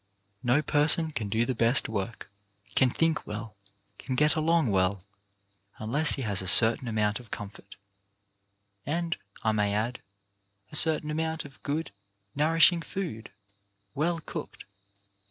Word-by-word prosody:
No 130 +4 +2
person 155 +2 +3
can 110 -8 -4
do 110 +3 +1
the 130 - -1
best 115 +2 +2
work, 110 0 -5 0.5
can 130 - +3
think 165 +4 -1
well, 105 +1 -7 0.4
can 130 - -4
get 150 +3 +3
along 160 -5 +1
well, 95 +1 +1 0.8
unless 140 +8 +3
he 135 - -3
has 100 -4 0
a 95 - -6
certain 115 +6 +5
amount 105 -1 -1
of 120 -3 -15
comfort, 100 -1 -9 1.1
and, 170 +3 -2 0.3
I 110 - +2
may 105 -1 0
add, 115 +3 -2 0.7
a - - -7
certain 155 -1 +5
amount 160 0 -3
of 135 -2 -14
good, 150 -2 -3 0.4
nour 155 +3 0
ishing 170 0 +5
food, 150 - -6 0.6
well 165 +3 -1
cooked. - - -8
130 Hz, 140 wpm, -27 LUFS, 110-155 Hz, 1.1 s, certain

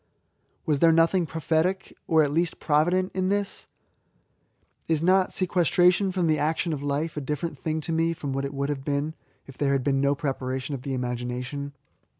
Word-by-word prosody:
Was 150 -3 +1
there 165 +2 +6
nothing 165 +2 +3
prophetic, 165 +4 -1
or 160 -1 +4
at 145 - 0
least 165 +3 0
provident, 175 +5 +2
in 185 0 0
this? 200 0 -1 1.2
Is 160 -1 +1
not 185 +1 +3
sequestration 180 +1 +3
from 180 -2 0
the 155 -2 +2
action 160 +2 0
of 140 - -4
life 145 +3 -2
a - - -1
different 150 +3 -3
thing 160 0 -2
to 165 - -3
me 165 +1 +1
from 145 -4 -4
what 135 +1 -2
it 140 0 -4
would 140 +1 -1
have 140 -2 -3
been 145 +2 -1 0.3
if 135 - -14
there 140 -1 +2
had 135 -2 +1
been 135 0 +1
no 140 +1 +2
preparation 135 -1 -3
of 135 - -4
the 135 0 -3
imagination 125 +3 -4
155 Hz, 185 wpm, -26 LUFS, 140-170 Hz, 1.2 s, there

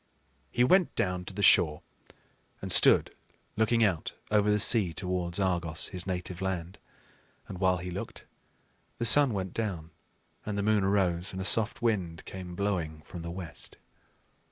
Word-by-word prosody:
He 120 - +1
went 185 +7 +2
down 90 -1 -2
to 95 - -7
the 100 - -3
shore 75 -5 +4 0.8
and - - -4
stood - - +5 0.4
looking 115 +1 +1
out 95 -7 -1 0.2
over 105 0 +2
the 105 - +2
sea 105 -4 +4
towards 90 0 -3
Argos, 85 -4 -1
his 90 0 -5
native 90 -1 -5
land; 95 -1 -4 0.7
and 90 - -9
while 95 -1 +2
he 90 +1 -7
looked, - - -8 0.7
the 120 - -2
sun 140 +3 +8
went 95 -3 -4
down, 90 -8 -4 0.5
and 105 -1 -5
the 100 - -1
moon 105 -1 +1
arose, 95 -3 -1
and 95 - -6
a 95 - -4
soft 115 +5 +2
wind 95 -8 -2
came 90 -2 -9
blowing 85 -6 -3
from 85 -1 -10
the 85 - -7
west. 85 -3 -8
95 Hz, 160 wpm, -28 LUFS, 85-105 Hz, 0.8 s, sun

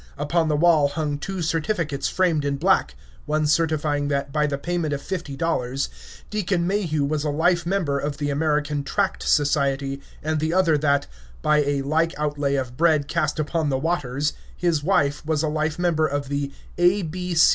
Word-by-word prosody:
Upon 160 +3 +1
the 150 - +1
wall 155 -2 +4
hung 145 0 -2
two 190 +1 -4
certificates 160 -2 -1
framed 170 -5 +1
in 140 0 0
black, 155 - +2 0.3
one 155 0 +1
certifying 150 -2 +1
that, 140 -1 -2
by 150 -1 +2
the 140 -1 -2
payment 165 -1 -1
of 140 - -6
fifty 175 -7 -4
dollars, 135 -4 -1 0.4
Deacon 190 -4 0
Mayhew 175 -7 0
was 150 +1 -1
a 150 - 0
life 170 +3 +1
member 170 -7 0
of 145 0 -3
the 145 -1 -1
American 150 -1 0
Tract 195 +7 -1
Society, 140 -2 +1 0.2
and 155 0 0
the 160 +3 0
other 180 -4 +4
that, 140 -1 +2 0.4
by 150 0 +4
a 140 -1 0
like 160 +4 0
outlay 145 -2 0
of 125 -2 -3
bread 155 -3 +3
cast - - 0
upon 155 0 0
the 135 - +1
waters, 145 -2 -1 0.2
his 170 -4 +1
wife 145 -5 +1
was 155 0 0
a - - +1
life 155 0 -1
member 170 -3 +2
of 140 -1 -3
the 140 -1 -2 0.3
A. 175 +1 +3
150 Hz, 180 wpm, -23 LUFS, 145-165 Hz, 0.4 s, wall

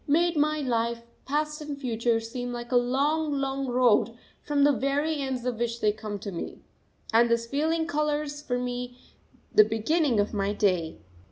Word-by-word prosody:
_ - - -32
made 340 +2 +3
my 305 0 +1
life, 235 -2 -1 0.2
past 300 +2 -1
and 295 -1 -5
future, 235 -3 0
seem 245 +2 -5
like 240 0 -6
a - - +2
long, 285 +6 +2
long 275 -1 -1
road, 245 -2 +3 0.3
from 290 -1 +1
the 290 - +6
very 280 +5 0
ends 265 -3 -3
of 245 -3 -2
which 235 0 -1
they 210 - +3
come 215 -1 -6
to 200 0 -6
me. 170 - -6 0.5
And 235 +1 +5
this 235 0 +1
feeling 315 +6 0
colours 300 -2 -1
for 245 -4 -2
me 245 0 -4 0.6
the 425 - +8
beginning 270 - +1
of 205 +2 0
my 200 0 0
day. 180 -6 0
250 Hz, 180 wpm, -27 LUFS, 230-295 Hz, 0.6 s, the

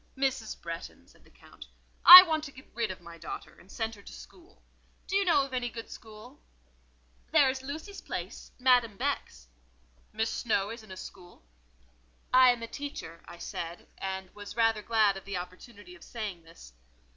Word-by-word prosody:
"Mrs. 265 -5 -2
Bretton," 170 0 -8
said - - -23
the - - -22
Count, - - -16 0.4
"I 365 +1 +14
want 315 -4 -2
to 280 - -9
get 260 -1 -16
rid 230 -1 -2
of 185 - -8
my 170 0 -12
daughter—to 170 +2 -10
send 225 +1 -4
her 205 - -14
to - - -13
school. 360 +2 -16 0.4
Do 385 - -4
you 395 - +3
know 335 -7 +3
of 270 - -12
any 245 -1 -2
good 230 -1 -9
school?" 215 - -13 0.9
"There 260 - +4
is 265 0 -7
Lucy's 310 +9 -8
place—Madame 245 -5 -1
Beck's." - - -4 0.6
"Miss 220 +1 -2
Snowe 205 -4 -1
is 230 0 -8
in 215 - -17
a 190 - -9
school?" 175 - -12 0.9
"I 255 0 +7
am 240 -2 0
a - - -5
teacher," 230 - -8
I - - -11
said, 170 0 -7
and 190 -1 -5
was 205 -1 -10
rather 225 -2 +2
glad 215 -3 +2
of 195 - -11
the 195 -2 -4
opportunity 185 +2 -10
of 175 - -15
saying 210 -7 -6
this. 165 - -15
220 Hz, 180 wpm, -29 LUFS, 190-260 Hz, 0.9 s, I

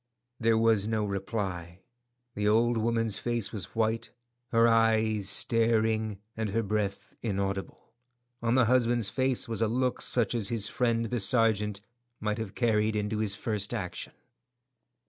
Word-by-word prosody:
There 115 -1 +3
was 110 -2 +3
no 110 -1 0
reply; 95 -3 -4 0.5
the 105 0 -1
old 115 +3 +3
woman's 115 -1 0
face 120 -3 -1
was 105 0 -5
white, 115 +1 0 0.4
her 115 -1 +4
eyes 110 -3 +2
staring, 110 -1 +1 0.2
and 110 -1 -2
her 115 +3 0
breath 100 -1 -3
inaudible; 100 -2 -4 0.5
on 115 +1 +1
the 130 -2 +5
husband's 120 -3 +2
face 130 +3 0
was 115 -1 -3
a 115 - +3
look 125 +2 0
such 120 -3 +1
as 110 -5 0
his 115 -4 +1
friend 115 -2 0
the 120 - 0
sergeant 105 -2 +2 0.4
might 105 +1 -2
have 110 -3 -6
carried 110 -2 +1
into 105 +1 -1
his 105 -2 -1
first 105 0 -1
action. 90 -6 -5
110 Hz, 145 wpm, -29 LUFS, 105-115 Hz, 0.5 s, the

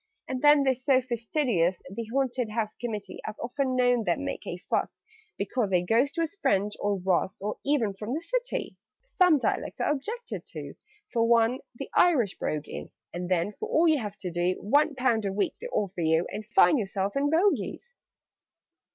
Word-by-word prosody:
"And 255 -1 -3
then 295 -1 +6
they're 265 -1 +3
so 260 +1 +2
fastidious, 235 - 0
The 215 +5 -5
Haunted 255 -3 0
House 215 -1 -2
Committee: 210 -5 -5
I've 215 - -6
often 255 +2 -1
known 245 -2 +3
them - - 0
make - - -5
a - - -4
fuss - - -2 0.4
Because 205 +1 -1
a 180 -1 +3
Ghost 245 - +2
was 330 0 0
French, 205 -7 +2
or 205 -1 0
Russ, 185 0 0
Or 210 +2 -4
even 265 -8 +1
from 210 +6 -4
the 320 - -3
City! - - -3 0.3
"Some 365 -10 +4
dialects 265 - -2
are - - +1
objected 445 - -4
to - - -7 0.4
For 230 -1 +2
one, 235 +2 +3 0.2
the 275 - -7
Irish 265 - +3
brogue 150 -1 -2
is: - - -8 0.2
And 175 +1 -4
then, 185 +3 +1
for - - -4
all 330 +2 +4
you 310 -3 +4
have 210 -3 -5
to 180 - -4
do, 175 +2 +1
One 290 +7 +2
pound 250 -4 +1
a - - -1
week 200 +1 0
they 485 - -4
offer 195 - -2
you, 160 +1 +2
And 215 0 -6
find 245 +4 +5
yourself 195 0 -2
in 280 +1 +2
Bogies!" 400 +8 0
235 Hz, 185 wpm, -27 LUFS, 200-280 Hz, 0.4 s, then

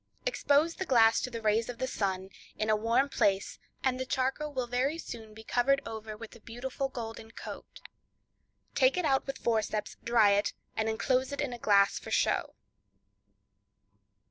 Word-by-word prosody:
Expose 320 -9 +2
the 375 - -4
glass 225 -3 +5
to - - -3
the 230 -2 -6
rays 220 +2 +2
of 245 - -5
the 260 - -1
sun, 190 -5 -2 0.3
in 215 0 +1
a - - +5
warm 230 +6 +2
place, 195 -7 0 0.2
and 255 -1 +1
the 260 - -2
charcoal 265 +4 -1
will 260 -3 -2
very 255 +6 0
soon 220 -8 -8
be 220 - -11
covered 260 +5 +2
over 220 -1 -6
with 230 +1 -10
a - - -13
beautiful 260 +4 -4
golden 225 -3 -7
coat. - - -9 0.9
Take 260 +4 +4
it 360 - +1
out 270 -2 +2
with 275 - -4
forceps, 220 -2 -1
dry 230 -3 +5
it, 200 +1 +2 0.2
and 220 0 0
enclose 255 +4 +1
it 280 - -5
in 280 -4 -1
a 240 - -7
glass 200 -3 +4
for - - -9
show. - - +1
235 Hz, 175 wpm, -30 LUFS, 220-265 Hz, 0.9 s, glass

